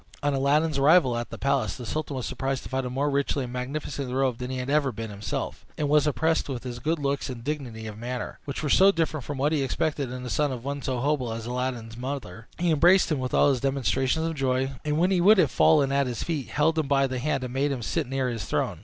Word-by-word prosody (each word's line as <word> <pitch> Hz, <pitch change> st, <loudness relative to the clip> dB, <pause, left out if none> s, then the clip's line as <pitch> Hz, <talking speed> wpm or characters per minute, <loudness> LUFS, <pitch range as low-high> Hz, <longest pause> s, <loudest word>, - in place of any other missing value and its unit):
On 145 Hz, 0 st, +2 dB
Aladdin's 140 Hz, +2 st, +2 dB
arrival 140 Hz, -3 st, +5 dB
at 120 Hz, 0 st, -3 dB
the -, -, -7 dB
palace, 135 Hz, -5 st, 0 dB
the 125 Hz, -, -8 dB
sultan 150 Hz, +3 st, -3 dB
was 130 Hz, -, -3 dB
surprised 135 Hz, -1 st, -2 dB
to -, -, -9 dB
find 130 Hz, -1 st, -1 dB
him 125 Hz, -, -6 dB
more 140 Hz, +3 st, 0 dB
richly 140 Hz, -1 st, 0 dB
and 125 Hz, -1 st, -6 dB
magnificently 135 Hz, +1 st, -4 dB
robed 130 Hz, -2 st, 0 dB
than 125 Hz, 0 st, -4 dB
he 130 Hz, -, -3 dB
had 125 Hz, 0 st, -4 dB
ever 140 Hz, -1 st, +2 dB
been 110 Hz, -1 st, -6 dB
himself, 100 Hz, 0 st, -4 dB
and 150 Hz, -, 0 dB
was 150 Hz, 0 st, +4 dB
impressed 160 Hz, +3 st, +1 dB
with 125 Hz, -3 st, -4 dB
his 120 Hz, -2 st, -6 dB
good 155 Hz, +7 st, 0 dB
looks 140 Hz, -1 st, -2 dB
and 120 Hz, -2 st, -7 dB
dignity 125 Hz, -6 st, -4 dB
of 110 Hz, -1 st, -7 dB
manner, 125 Hz, +1 st, -5 dB
which 140 Hz, +1 st, -5 dB
were -, -, 0 dB
so 195 Hz, +6 st, +6 dB
different 160 Hz, -5 st, -1 dB
from 145 Hz, +3 st, -5 dB
what 145 Hz, +3 st, +1 dB
he 155 Hz, -3 st, +1 dB
expected 135 Hz, 0 st, -1 dB
in 125 Hz, 0 st, -6 dB
the 125 Hz, -, -5 dB
son 150 Hz, -2 st, +1 dB
of 125 Hz, -1 st, -6 dB
one 140 Hz, 0 st, -3 dB
so 130 Hz, -2 st, -2 dB
humble 140 Hz, -4 st, 0 dB
as 115 Hz, 0 st, -5 dB
Aladdin's 120 Hz, -2 st, -3 dB
mother. 125 Hz, -5 st, -6 dB
He 170 Hz, 0 st, +1 dB
embraced 175 Hz, +4 st, +5 dB
him 150 Hz, -, +1 dB
with 130 Hz, -1 st, -2 dB
all 145 Hz, -, +5 dB
the 130 Hz, -, -2 dB
demonstrations 135 Hz, +3 st, 0 dB
of 165 Hz, -, -1 dB
joy, 135 Hz, -2 st, 0 dB
and 150 Hz, 0 st, 0 dB
when 180 Hz, +4 st, +3 dB
he 180 Hz, -2 st, +3 dB
would 210 Hz, +4 st, +7 dB
have 185 Hz, -, +3 dB
fallen 145 Hz, -4 st, +4 dB
at 140 Hz, -1 st, +2 dB
his 120 Hz, -2 st, -3 dB
feet, 155 Hz, -6 st, -3 dB
held 160 Hz, +2 st, +1 dB
him 155 Hz, -, -1 dB
by 135 Hz, -1 st, +3 dB
the 130 Hz, -1 st, -3 dB
hand, 140 Hz, 0 st, -1 dB
and 125 Hz, -1 st, -5 dB
made 140 Hz, +2 st, +1 dB
him 125 Hz, -4 st, -3 dB
sit 155 Hz, +4 st, -1 dB
near 135 Hz, 0 st, -1 dB
his 115 Hz, -3 st, -3 dB
throne. -, -, -1 dB
135 Hz, 265 wpm, -26 LUFS, 125-150 Hz, -, would